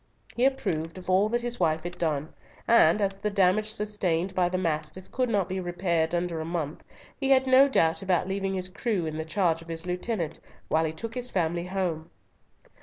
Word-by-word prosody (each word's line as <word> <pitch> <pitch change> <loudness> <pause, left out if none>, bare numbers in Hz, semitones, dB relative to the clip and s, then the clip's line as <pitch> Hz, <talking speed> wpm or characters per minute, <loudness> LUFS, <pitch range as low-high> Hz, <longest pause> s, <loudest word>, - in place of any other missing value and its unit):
He 245 - +2
approved 180 - -1
of 185 0 -4
all 195 +3 +4
that 240 +1 0
his 240 0 -1
wife 160 -2 +1
had 175 0 -5
done; 155 -3 -2 0.3
and 210 -5 +5
as 195 0 -1
the 210 +2 -2
damage 200 +1 +2
sustained 195 -5 -1
by 180 -1 +2
the 185 - -1
Mastiff 165 +1 -3
could 255 -1 0
not 200 -5 +1
be 190 0 -3
repaired 175 -2 0
under 170 -2 -2
a - - -3
month, 160 -2 -4 0.4
he 270 -1 0
had 265 -1 +5
no 260 +1 +6
doubt 165 -10 +2
about 185 -2 +1
leaving 195 0 -2
his 185 -1 -2
crew 195 -1 -2
in 155 0 -4
the - - -1
charge 165 -1 +1
of 165 - -14
his 165 0 -3
lieutenant 180 -2 -3 0.3
while 160 +1 +2
he 155 - -1
took 225 +8 -6
his 250 0 -1
family 170 -3 -1
home. 175 -4 -2
180 Hz, 205 wpm, -27 LUFS, 165-210 Hz, 0.4 s, no